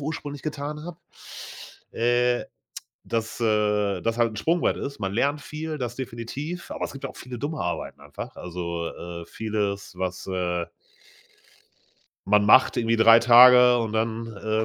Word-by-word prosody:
ursprünglich 145 -1 -5
getan 150 0 -5
habe, 175 -1 -8 1.0
äh, 120 +1 +1 0.6
dass, 115 0 -3
äh, 105 -3 +1
das 115 0 -1
halt 115 -1 +2
'n - - -9
Sprungbrett 165 - +1
ist. 140 0 -6
Man 95 -1 -3
lernt 140 +7 0
viel, 155 +1 -6
das 120 -2 -4
definitiv, 135 +7 -6
aber - - -4
es - - -6
gibt 135 - -10
ja 135 - -3
auch - - -16
viele 125 -1 -8
dumme 150 +5 -4
Arbeiten 85 - -4
einfach. - - -9
Also, 85 -1 -5
äh, 85 0 -8
vieles, 105 -1 -3
was, 90 0 -4
äh 90 -2 -2 1.6
man 105 +1 +4
macht 130 +5 +6
irgendwie 115 -1 +1
3 115 +1 +7
Tage 125 +1 +8
und 115 -2 -2
dann, 115 +1 -1 0.2
äh, 110 0 0
115 Hz, 155 wpm, -25 LUFS, 105-135 Hz, 1.6 s, Tage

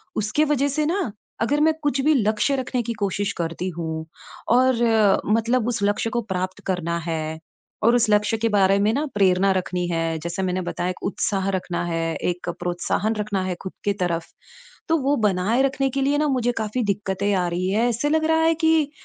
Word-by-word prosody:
उसके 215 +8 +1
वज़ह 285 -2 +1
से 300 +2 0
न, 360 - -1 0.3
अगर 285 +6 +1
मैं 315 +1 +4
कुछ 285 -2 +1
भी 305 +3 +4
लक्ष्य 220 +3 +1
रखने 255 -1 -1
की 235 +1 -3
कोशिश 200 0 -1
करती 170 +2 -3
हूँ 160 -1 -4 0.5
और 255 +1 +4 0.5
मतलब 230 +3 +1
उस 245 -2 -1
लक्ष्य 205 +2 +1
को 240 0 -1
प्राप्त 185 -3 -3
करना 170 -3 -1
है 160 -1 -3 0.4
और 235 +2 +5
उस 235 -2 +2
लक्ष्य 210 +1 +2
के 225 +1 0
बारे 195 -2 +4
में 210 +2 +3
न 290 +5 0
प्रेरणा 195 -1 +3
रखनी 180 -1 -2
है। 165 -1 -1
जैसे 170 +4 -3
मैंने 185 0 -1
बताया, 175 0 -3
एक 185 - -6
उत्साह 195 0 -1
रखना 180 -2 -3
है, 165 -1 -2
एक 175 +1 -3
प्रोत्साहन 180 +5 -1
रखना 210 -2 -2
है 185 -1 -2
ख़ुद 190 - -6
की 205 - +2
तरफ। 170 -4 -2 0.6
तो 325 - +3
वो 275 +2 +2
बनाए 200 +7 +1
रखने 270 0 +1
के 275 +1 -1
लिए 285 +2 +2
न 305 - +2
मुझे 245 -2 +1
काफ़ी 220 +3 -2
दिक्कतें 200 0 -2
आ 180 -2 +1
रही 180 +2 -1
हैं, 225 +5 +2
ऐसे 240 +5 0
लग 315 +1 +2
रहा 320 0 +3
है 325 0 +4
कि 320 -2 +2
205 Hz, 200 wpm, -23 LUFS, 180-255 Hz, 0.6 s, और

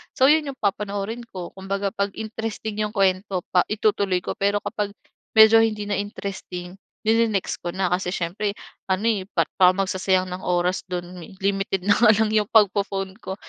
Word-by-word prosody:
So, 265 +3 +5
yun 310 -1 +3
yung 275 - -5
papanoorin 205 +3 -2
ko. 180 -5 -7
Kumbaga 195 +1 -3
'pag 200 0 -2
interesting 220 -1 -5
yung 210 +2 -7
kuwento 190 -1 +1
pa 180 - +3
itutuloy 200 -3 +1
ko. - - -4
Pero 200 +1 +1
kapag 205 -3 -3 0.4
medyo 220 +1 +8
hindi 220 -2 +1
na 205 0 -2
interesting, 195 -2 -6 0.2
ni-ne-next 220 -3 +1
ko 175 0 -4
na, 190 -2 0
kasi 180 0 0
siyempre 200 +4 -2 0.3
ano, 190 +2 0
eh, 195 -4 -1
pa - - +1 0.2
parang 185 +1 +5
magsasayang 185 -1 0
ng 185 +1 -6
oras 180 +1 0
do'n 175 -1 -5
mi 175 +3 -11
limited 195 -1 0
na 205 +2 +3
nga 220 -2 +7
lang 215 0 +1
'yong 215 -2 +2
pagpo-phone 200 -3 +2
ko, 190 - -6
200 Hz, 180 wpm, -23 LUFS, 185-215 Hz, 0.4 s, medyo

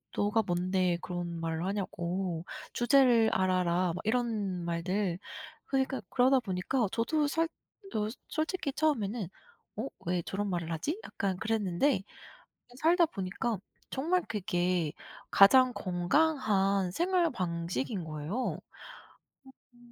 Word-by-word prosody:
"너가 210 +2 +2
뭔데 180 -1 +1
그런 175 -1 -4
말을 165 +1 -2
하냐."고 185 -3 -2 0.3
"주제를 240 -3 +5
알아라." 185 -1 +2
막 - - -4
이런 220 -6 0
말들 175 +2 -1 0.5
그러니까 265 -2 0
그러다 260 +1 +4
보니까 210 +3 -1
저도 290 +6 +1
살 325 +3 +1 0.5
어 210 -1 0 0.2
솔직히 315 -2 -1
처음에는 240 - 0 0.5
'어? 230 +6 -3 0.2
왜 175 0 0
저런 200 +4 -3
말을 170 -2 -2
하지?' 225 - -2
약간 195 -2 -2
그랬는데 220 +2 +1 0.7
그 245 - -18
살다 340 +2 +5
보니까 200 - -3 0.3
정말 335 +7 +1
그게 180 -5 0 0.4
가장 255 +6 +7
건강한 195 - +1
생활 350 - +2
방식인 170 - -2
거예요. 155 +3 -5
어 255 +1 0 1.2
어. - - -22
200 Hz, 245 characters per minute, -31 LUFS, 180-255 Hz, 1.2 s, 가장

